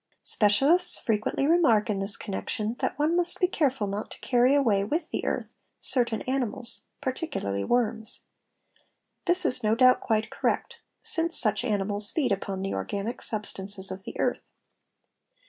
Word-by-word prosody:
Specialists 280 - +4
frequently 220 +4 -1
remark 285 -10 +3
in 205 -3 -2
this 195 +1 +2
connection, 210 +2 -4
that - - -3
one 305 +3 0
must 350 0 +5
be 365 - +3
careful 270 - -1
not 200 +1 -5
to - - -12
carry 250 +2 +2
away, 220 -9 +2
with 305 - -3
the - - -3
earth, - - -4 0.3
certain 235 -4 -1
animals, 255 -2 -3 0.2
particularly 175 - -4
worms. 225 - -1 1.0
This 360 +1 +3
is 250 - +5
no 215 -1 +1
doubt 255 +1 +4
quite 220 -1 -2
correct - - -3 0.2
since 335 0 +2
such 215 0 +2
animals 205 -2 +2
feed 290 -8 -1
upon 195 -1 -3
the 195 - -3
organic 200 - -5
substances 200 -2 +1
of 190 - -7
the - - -10
earth. - - -2
225 Hz, 150 wpm, -26 LUFS, 205-270 Hz, 1.0 s, must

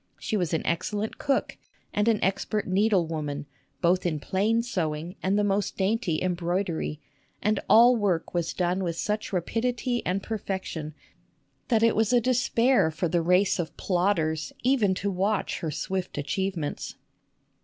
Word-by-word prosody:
She 220 - -3
was 180 -6 0
an 160 - -1
excellent 210 +5 -2
cook 275 -2 0 0.4
and 210 +1 +1
an 225 -2 +4
expert 195 +2 0
needlewoman, 165 -8 +1
x - - -11
SUSAN 140 - -39
COOLIDGE 130 - -39
both 180 +2 +3
in 155 -3 -1
plain 210 +9 +1
sewing 170 -5 -3
and 190 +2 +1
the 210 - +2
most 200 -1 0
dainty 190 -5 0
embroidery, 175 -3 -1 0.4
and 210 -1 +1
all 240 +2 +7
work 195 -7 0
was 170 -2 -1
done 180 +1 0
with 170 -2 -2
such 210 +5 -2
rapidity 240 +6 -1
and 190 +2 -1
perfection 190 -8 -4 0.7
that 225 -3 +2
it 230 - +4
was 220 +1 +2
a 245 - +5
despair 245 -3 +3
for 160 +3 -2
the 170 +1 +1
race 180 +4 +3
of 165 - -4
plodders 170 -5 0
even 240 -7 +3
to 200 +1 -2
watch 195 +2 0
her 160 - -3
swift 185 +4 -3
achievements. 165 +1 -3
190 Hz, 160 wpm, -27 LUFS, 170-215 Hz, 0.7 s, all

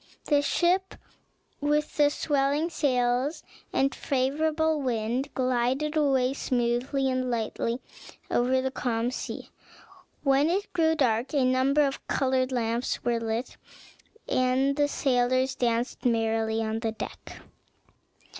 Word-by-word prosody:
The 290 -2 +3
ship, 360 +6 +1 0.6
with 295 +1 0
swelling 290 +3 0
sails 255 -1 0 0.3
and 275 +1 +1
a - - -9
favorable 305 +3 0
wind, 245 +2 -1
glided 255 +4 0
away 270 -4 +2
smoothly 255 +1 0
and 255 -1 -1
lightly 230 +1 -2 0.5
over 255 +2 +2
the 265 0 -2
calm 240 -2 -1
sea. - - -6 0.7
When 275 +2 +3
it 395 +4 -2
grew 320 -2 +3
dark 250 -1 +1
a 270 -3 +3
number 260 +3 +3
of 275 -1 -3
colored 260 -1 +1
lamps 235 0 -1
were 235 -1 +1
lit, 225 +2 -3 0.7
and 255 +2 +2
the 290 0 +2
sailors 255 -1 +1
danced 240 0 -1
merrily 225 -2 +1
on 220 0 -2
the 225 -1 -2
deck. - - -8
260 Hz, 120 wpm, -27 LUFS, 240-285 Hz, 0.7 s, The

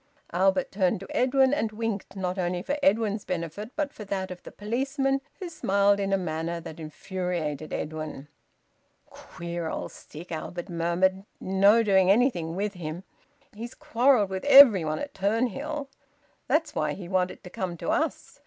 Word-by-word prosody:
Albert 190 +1 +2
turned 185 -2 +1
to 195 - -9
Edwin 265 +1 +3
and 225 -7 0
winked, 215 -3 -4
not 185 -1 -3
only 175 0 -1
for 280 - -1
Edwin's 210 -2 +2
benefit 180 +4 -4
but 300 -1 -2
for 215 - -8
that 190 -1 -3
of 180 - -8
the - - -11
policeman, 270 +5 -1 0.2
who 370 - -5
smiled 200 - +2
in 195 -1 -1
a 195 - +3
manner 170 -1 -3
that 160 -1 -9
infuriated 160 -2 -4
Edwin. 155 -2 -5 0.8
"Queer 170 -1 -6
old - - -4
stick!" 170 +4 -12
Albert 170 +2 -5
murmured. 175 +3 +1 0.2
"No 200 +4 +4
doing 190 -3 +4
anything 195 -7 +2
with 205 +2 -2
him. 170 0 -6 0.5
He's 230 +3 -8
quarrelled 235 -4 +2
with 190 0 -3
everybody 215 - +7
at 285 -1 -7
Turnhill. 255 +8 -1 0.6
That's 320 +1 +1
why 150 -1 -1
he 180 0 -8
wanted 185 0 -1
to 180 - -10
come 180 -2 -4
to - - -4
us. - - -2
190 Hz, 160 wpm, -27 LUFS, 175-225 Hz, 0.8 s, everybody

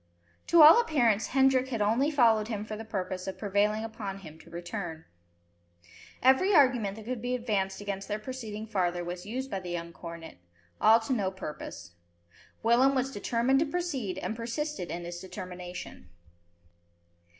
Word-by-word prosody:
To 340 -2 +7
all 325 +10 +10
appearance 240 - +2
Hendrik 265 -1 +3
had 240 -4 -3
only 225 +8 +2
followed 230 -7 +3
him 215 -2 -4
for 215 - -5
the 220 - -7
purpose 185 -4 -4
of 190 - -4
prevailing 210 +1 +1
upon 210 -3 -5
him 160 -5 -12
to - - -16
return. 170 -2 -6 1.2
Every 265 +10 +5
argument 250 -9 +4
that 220 -1 -10
could 245 -1 -4
be 250 +1 -1
advanced 205 -5 -1
against 200 -1 -4
their 210 - -2
proceeding 220 -2 -6
farther 180 -5 -1
was 175 +2 -6
used 260 +4 -4
by 195 - -2
the 180 -1 -8
young 170 -1 -5
cornet, 170 - -9 0.4
all 220 +1 +7
to 240 +4 -2
no 200 -6 0
purpose. 150 - -8 0.7
Willem 250 +4 +4
was 265 +1 0
determined 245 +4 +1
to 315 - +2
proceed, 280 - -3
and 215 - -3
persisted 235 - -4
in 170 +2 -5
his 175 0 -6
determination. 180 - -8
215 Hz, 160 wpm, -29 LUFS, 185-255 Hz, 1.2 s, all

